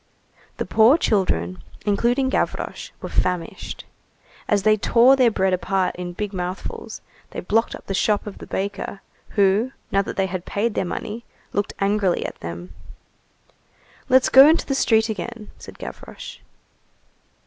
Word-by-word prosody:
The - - -2
poor 230 +7 +5
children, 90 - 0 0.2
including 240 +6 +2
Gavroche, - - -2
were - - -3
famished. 180 -2 -2 0.6
As 205 -2 +2
they 215 +1 +5
tore 235 +5 +5
their 255 -3 +4
bread 190 -3 +1
apart 185 +1 0
in 175 0 -6
big 210 +2 -4
mouthfuls, 180 0 -5 0.3
they - - -6
blocked 225 +5 0
up - - -13
the 195 - -3
shop 205 +2 +1
of 210 - -8
the - - -10
baker, 200 0 -4 0.4
who, 205 +6 +3 0.2
now 195 - +3
that - - -6
they 195 - +2
had 185 -1 -4
paid 210 +4 -1
their - - -1
money, 215 +6 -5 0.3
looked 205 - -1
angrily 200 -2 +1
at - - -6
them. 85 +1 -7 1.4
"Let's 260 0 +5
go 270 +2 +9
into 325 - +2
the 275 - -1
street 225 -4 +3
again," 220 0 -6
said - - -11
Gavroche. - - -9
205 Hz, 150 wpm, -22 LUFS, 185-230 Hz, 1.4 s, go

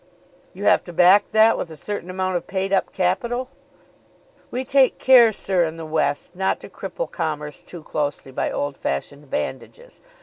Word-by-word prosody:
"You - - -7
have - - +4
to 175 - -9
back 185 +4 +5
that 220 +1 +5
with 170 - -4
a 160 - -10
certain 200 +2 -5
amount 185 0 -2
of 175 - -3
paid 195 0 -2
up 195 - +1
capital?" 235 +8 -1 1.0
"We 255 +2 -3
take 270 0 +3
care, 245 -4 +6
sir, 190 -3 0
in 165 0 -3
the 165 - -7
West 155 +1 -1
not 190 +1 0
to - - -10
cripple - - -6
commerce 150 -2 -4
too 175 -3 -11
closely 145 -3 -3
by - - -2
old 145 -1 -3
fashioned 140 - -4
bandages. 485 - -6
185 Hz, 175 wpm, -22 LUFS, 155-220 Hz, 1.0 s, care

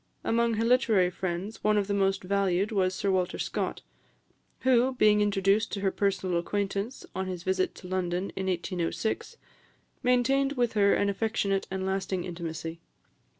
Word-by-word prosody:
Among 230 0 +2
her 225 +2 0
literary 225 -7 +3
friends, 185 +4 -4
one 215 0 +3
of 205 - +2
the 200 - -2
most 195 -1 +1
valued 195 +1 +1
was 185 -3 +1
Sir 200 - 0
Walter 185 -1 0
Scott, - - -3 0.8
who, 255 0 +3
being 210 -3 +4
introduced 205 +2 +2
to 200 - -3
her 195 -1 +1
personal 190 -3 0
acquaintance 200 +6 -3
on 190 +1 -3
his 180 -2 -5
visit 185 0 0
to 180 - -10
London 185 0 -2
in 190 0 -3
1806, 185 - -2 0.6
maintained 270 +2 +2
with 245 -4 0
her 200 -2 +4
an 200 - +1
affectionate 200 -1 0
and 190 0 -3
lasting 190 -1 -1
intimacy. 165 -2 -5
195 Hz, 155 wpm, -28 LUFS, 185-215 Hz, 0.8 s, being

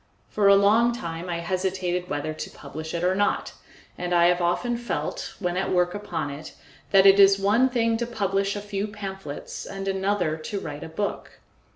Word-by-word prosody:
For 205 -2 +2
a 200 - +8
long 220 +4 +4
time 170 -4 -6
I 170 -1 -2
hesitated 180 0 -2
whether 145 +2 -2
to 155 - -6
publish 155 +3 -8
it 170 - -2
or 180 +1 +3
not, 205 +2 0 0.5
and 180 0 -1
I 170 0 +5
have 180 0 +1
often 175 +8 0
felt, 190 -11 -4
when 180 -2 -2
at 190 - -1
work 180 -1 +2
upon 170 -8 -4
it, 145 +3 -9 0.3
that 195 -1 +5
it 195 0 +7
is 195 0 +7
one 210 +7 +3
thing 230 -2 +1
to 235 0 -2
publish 195 -3 -1
a 205 - -4
few 205 0 -3
pamphlets 195 -7 -7
and 195 0 -6
another 190 -4 0
to 195 +6 -5
write 145 -5 -7
a - - -7
book. 200 +6 -4
195 Hz, 195 wpm, -25 LUFS, 175-205 Hz, 0.5 s, a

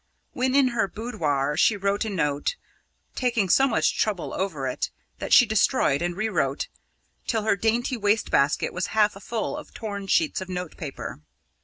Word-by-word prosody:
When 260 +1 0
in 275 -2 +5
her 230 -5 0
boudoir, 155 - -1
she 205 +6 +3
wrote 200 +2 0
a - - -2
note, 150 - -1 0.6
taking 235 -7 0
so 270 +9 +5
much 230 - +1
trouble 205 -5 -1
over 175 -8 -2
it 130 - -2 0.3
that - - -5
she 265 -3 +8
destroyed, 215 - +2
and 175 +1 -2
rewrote, 180 -10 -1 0.6
till 225 -3 0
her 215 - +2
dainty 235 +5 0
waste 205 0 +1
basket 140 +2 +2
was 180 0 -2
half 210 -1 +4
full 230 +5 -3
of 300 - -10
torn 200 -3 -5
sheets 165 -1 +2
of 185 - -7
notepaper. 175 - -6
205 Hz, 165 wpm, -25 LUFS, 170-230 Hz, 0.6 s, she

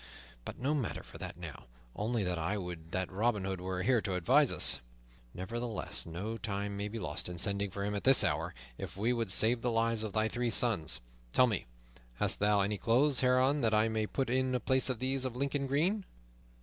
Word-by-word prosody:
But - - -7
no 140 +4 0
matter 135 -9 -2
for - - -13
that - - -6
now; 85 -6 -8 0.3
only 110 +1 -1
that 90 -2 -2
I 90 +6 -1
would 85 -3 -7
that 95 0 -2
Robin 105 +1 0
Hood 95 -2 -3
were 90 0 -3
here 120 +1 +3
to 95 -3 -3
advise 90 -2 +4
us. - - +6 0.6
Nevertheless, 110 - -3
no 100 +8 -5
time 100 0 -3
may 100 +1 -3
be 110 +2 -6
lost 90 -5 -3
in 90 - -6
sending 100 +2 0
for 100 +1 -4
him 105 - -2
at 100 - -3
this 135 0 +7
hour, - - -1 0.2
if 95 -1 -7
we 115 +5 +1
would 115 -5 -1
save 115 +5 +4
the 125 - 0
lives 115 -1 +1
of 110 -3 -4
thy 110 0 +2
three 120 +1 -1
sons. 110 -9 0 0.3
Tell 130 - +6
me, 105 - -2 0.5
hast - - -1
thou 105 0 +3
any 100 +1 -1
clothes 130 +4 +3
hereabouts 130 +3 +3
that 110 -2 +2
I 110 +1 +3
may 110 -1 -1
put 135 +3 -2
on - - +2 0.2
in - - +1
place 130 +4 +2
of 130 - -1
these 130 +2 0
of 130 -2 -3
Lincoln 140 +1 -1
green? 175 +10 +1
110 Hz, 215 wpm, -32 LUFS, 95-125 Hz, 0.6 s, this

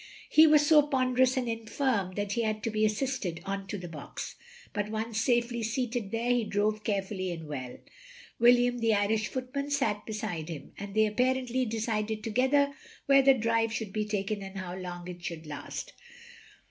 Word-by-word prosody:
He 315 +1 +7
was 300 -1 +6
so 300 0 +7
ponderous 260 -1 +2
and 250 -2 0
infirm 225 -3 -1
that 205 -1 -2
he 235 - 0
had 215 -1 -1
to 225 - -1
be 215 0 0
assisted 215 -6 -1
on 195 0 -3
to 205 - -4
the 180 -2 -7
box; 155 -4 -7 0.4
but 205 0 -2
once 220 0 -2
safely 240 -1 +1
seated 230 -1 -2
there, 230 +3 0
he 245 -1 +2
drove 210 +1 0
careftilly 195 -3 -2
and 165 -2 -6
well. 130 -4 -6 0.6
William 245 +1 +5
the 225 -2 +3
Irish 215 +1 +1
footman 270 +2 -4
sat 225 -8 0
beside 205 -7 -4
him, 150 -4 -7
and 200 0 -7
they 220 0 +5
apparently 255 +3 +1
decided 220 -1 -2
together 265 +6 +2 0.3
where 275 0 +6
the 270 0 +6
drive 230 -1 +1
shotild 220 -3 -4
be 215 -1 -1
taken 205 0 -2
and 195 0 -8
how 185 -1 -5
long 180 -1 -6
it 175 -1 -8
should 170 -3 -5
last. 145 -1 -6
220 Hz, 180 wpm, -29 LUFS, 195-245 Hz, 0.6 s, He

